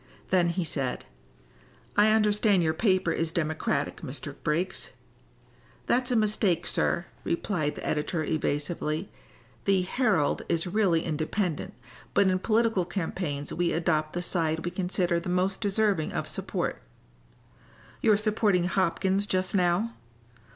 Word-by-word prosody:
Then 180 Hz, -2 st, +4 dB
he 175 Hz, +1 st, -1 dB
said: 140 Hz, -5 st, -2 dB, 0.9 s
"I 210 Hz, +1 st, +5 dB
understand 210 Hz, -3 st, +3 dB
your 160 Hz, -1 st, +2 dB
paper 185 Hz, -1 st, +2 dB
is 165 Hz, -1 st, -1 dB
Democratic, 155 Hz, -3 st, -1 dB
Mr. 140 Hz, +2 st, -6 dB
Briggs." 170 Hz, +4 st, -1 dB, 0.9 s
"That's 250 Hz, +1 st, +1 dB
a 250 Hz, -, +1 dB
mistake, 205 Hz, -5 st, +2 dB
sir," 170 Hz, -, 0 dB, 0.2 s
replied 170 Hz, -3 st, -1 dB
the -, -, -7 dB
editor, 155 Hz, +2 st, -1 dB
evasively. 155 Hz, +2 st, -2 dB, 0.5 s
"The 195 Hz, -2 st, +3 dB
Herald 195 Hz, -, +1 dB
is 165 Hz, +1 st, +1 dB
really 180 Hz, -3 st, +2 dB
independent, 165 Hz, +3 st, -2 dB, 0.4 s
but 200 Hz, -, +5 dB
in 185 Hz, 0 st, +1 dB
political 225 Hz, -2 st, +2 dB
campaigns 170 Hz, -5 st, -3 dB
we 175 Hz, 0 st, 0 dB
adopt 155 Hz, -2 st, 0 dB
the 175 Hz, -, -2 dB
side 160 Hz, -3 st, -1 dB
we 175 Hz, -, -2 dB
consider 180 Hz, -1 st, 0 dB
the 170 Hz, -, -6 dB
most 185 Hz, +2 st, 0 dB
deserving 205 Hz, -5 st, +1 dB
of -, -, -2 dB
support." -, -, -3 dB, 1.2 s
"You're 215 Hz, -3 st, +5 dB
supporting 210 Hz, -3 st, +2 dB
Hopkins 190 Hz, +2 st, +1 dB
just 185 Hz, -1 st, +1 dB
now." 185 Hz, +4 st, +2 dB
180 Hz, 130 wpm, -27 LUFS, 160-200 Hz, 1.2 s, I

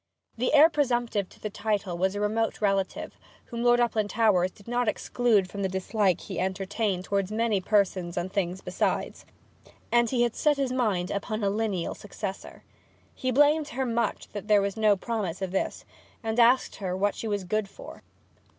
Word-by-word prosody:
The 250 Hz, +2 st, 0 dB
heir 300 Hz, +2 st, +9 dB
presumptive 240 Hz, -, 0 dB
to -, -, -19 dB
the 215 Hz, -, -5 dB
title 205 Hz, -4 st, -2 dB
was 190 Hz, +3 st, 0 dB
a -, -, -2 dB
remote 220 Hz, +2 st, 0 dB
relative, 195 Hz, -2 st, -1 dB, 0.3 s
whom 235 Hz, -1 st, -6 dB
Lord 240 Hz, 0 st, +4 dB
Uplandtowers 215 Hz, -5 st, +2 dB
did 200 Hz, +3 st, -20 dB
not 245 Hz, 0 st, 0 dB
exclude 215 Hz, -3 st, +1 dB
from 200 Hz, +2 st, -6 dB
the 190 Hz, -, 0 dB
dislike 190 Hz, 0 st, 0 dB
he 190 Hz, -4 st, -6 dB
entertained 190 Hz, +1 st, -1 dB
towards 200 Hz, 0 st, -1 dB
many 220 Hz, -2 st, +1 dB
persons 185 Hz, -4 st, +1 dB
and 175 Hz, +2 st, -3 dB
things 185 Hz, -1 st, -1 dB
besides, -, -, -2 dB, 0.6 s
and 240 Hz, -1 st, +4 dB
he 245 Hz, -2 st, +2 dB
had 240 Hz, -2 st, 0 dB
set 295 Hz, -2 st, +2 dB
his 270 Hz, -2 st, 0 dB
mind 205 Hz, -8 st, 0 dB
upon 215 Hz, +2 st, -3 dB
a 200 Hz, -, +2 dB
lineal 205 Hz, -5 st, -1 dB
successor. 200 Hz, -1 st, -7 dB, 0.5 s
He 255 Hz, -, -3 dB
blamed 290 Hz, +4 st, +4 dB
her 265 Hz, -3 st, -2 dB
much 235 Hz, -1 st, -1 dB
that 205 Hz, -1 st, -7 dB
there 210 Hz, -2 st, +5 dB
was 200 Hz, -1 st, -2 dB
no 215 Hz, -2 st, +3 dB
promise 200 Hz, -5 st, -3 dB
of 190 Hz, -2 st, -3 dB
this, 190 Hz, -, -2 dB, 0.4 s
and 225 Hz, +1 st, -1 dB
asked 240 Hz, +2 st, +4 dB
her 185 Hz, -2 st, -3 dB
what 205 Hz, +1 st, +1 dB
she 225 Hz, -, -5 dB
was 205 Hz, -2 st, -1 dB
good 210 Hz, +2 st, -1 dB
for. -, -, -11 dB
210 Hz, 180 wpm, -27 LUFS, 190-235 Hz, 0.6 s, heir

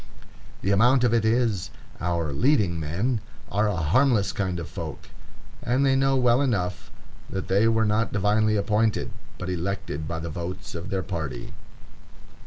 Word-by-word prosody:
The 100 Hz, -, +1 dB
amount 120 Hz, +6 st, +4 dB
of 120 Hz, -2 st, +3 dB
it 115 Hz, -2 st, +3 dB
is, 110 Hz, -4 st, +1 dB, 0.3 s
our 85 Hz, -4 st, -1 dB
"leading 105 Hz, -, +2 dB
men" 100 Hz, -, -1 dB, 0.3 s
are 105 Hz, +2 st, +2 dB
a 105 Hz, -, 0 dB
harmless 100 Hz, -, +2 dB
kind 95 Hz, -4 st, -2 dB
of 85 Hz, -, -5 dB
folk, -, -, -7 dB, 0.5 s
and 125 Hz, +3 st, +1 dB
they 135 Hz, -1 st, +4 dB
know 135 Hz, 0 st, +3 dB
well 125 Hz, 0 st, +4 dB
enough 100 Hz, -9 st, -1 dB, 0.4 s
that 95 Hz, -, -4 dB
they 100 Hz, +4 st, +4 dB
were 115 Hz, -1 st, +3 dB
not 110 Hz, +2 st, +1 dB
divinely 105 Hz, +2 st, +2 dB
appointed, 105 Hz, +1 st, +1 dB, 0.3 s
but 90 Hz, -, -5 dB
elected 90 Hz, -4 st, -3 dB
by 85 Hz, +1 st, -3 dB
the 80 Hz, 0 st, -5 dB
votes 90 Hz, +4 st, -6 dB
of 85 Hz, -1 st, -6 dB
their 95 Hz, -1 st, -1 dB
party. 75 Hz, -11 st, -5 dB
100 Hz, 160 wpm, -25 LUFS, 90-115 Hz, 0.5 s, amount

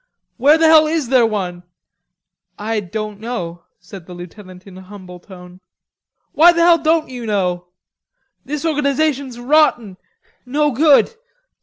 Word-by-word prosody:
"Where 290 Hz, +5 st, +4 dB
the 325 Hz, -, +2 dB
hell 315 Hz, -1 st, +5 dB
is 310 Hz, -5 st, -2 dB
there 250 Hz, -3 st, +3 dB
one?" 185 Hz, -5 st, -4 dB, 1.0 s
"I 220 Hz, +1 st, -3 dB
don't 210 Hz, +1 st, -7 dB
know," 175 Hz, -7 st, -7 dB
said 180 Hz, -1 st, -13 dB
the 180 Hz, -, -10 dB
lieutenant 185 Hz, +1 st, -13 dB
in 195 Hz, -2 st, -14 dB
a -, -, -12 dB
humble 185 Hz, -2 st, -13 dB
tone. 180 Hz, -1 st, -15 dB, 0.7 s
"Why 335 Hz, +3 st, +5 dB
the 335 Hz, -, 0 dB
hell 340 Hz, -1 st, +5 dB
don't 315 Hz, 0 st, 0 dB
you 245 Hz, -3 st, -8 dB
know? 180 Hz, -4 st, -2 dB, 0.8 s
This 300 Hz, +3 st, -6 dB
organization's 280 Hz, -4 st, -1 dB
rotten, 245 Hz, -7 st, +1 dB, 0.5 s
no 290 Hz, +4 st, -1 dB
good.... 295 Hz, -, +3 dB
230 Hz, 140 wpm, -17 LUFS, 185-300 Hz, 1.0 s, hell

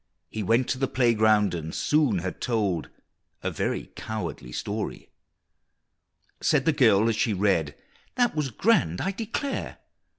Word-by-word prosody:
He 110 Hz, -, -4 dB
went 115 Hz, +5 st, +2 dB
to 130 Hz, -, -1 dB
the 135 Hz, -, +1 dB
playground, 110 Hz, -5 st, +3 dB
and 80 Hz, -2 st, -5 dB
soon 145 Hz, -9 st, +2 dB
had 95 Hz, -, -5 dB
told 100 Hz, -9 st, -1 dB, 0.5 s
A -, -, -1 dB
very -, -, -3 dB
cowardly 85 Hz, -, -5 dB
story! -, -, -4 dB, 1.3 s
Said -, -, +2 dB
the -, -, +3 dB
girl 100 Hz, +3 st, +4 dB
as 115 Hz, -, +1 dB
she 110 Hz, -, +1 dB
read, 90 Hz, -6 st, +1 dB, 0.4 s
"That 245 Hz, -6 st, +2 dB
was 150 Hz, -3 st, -1 dB
grand, 130 Hz, -, +2 dB
I 190 Hz, -, -1 dB
declare! 230 Hz, +7 st, -4 dB
110 Hz, 140 wpm, -26 LUFS, 95-135 Hz, 1.3 s, girl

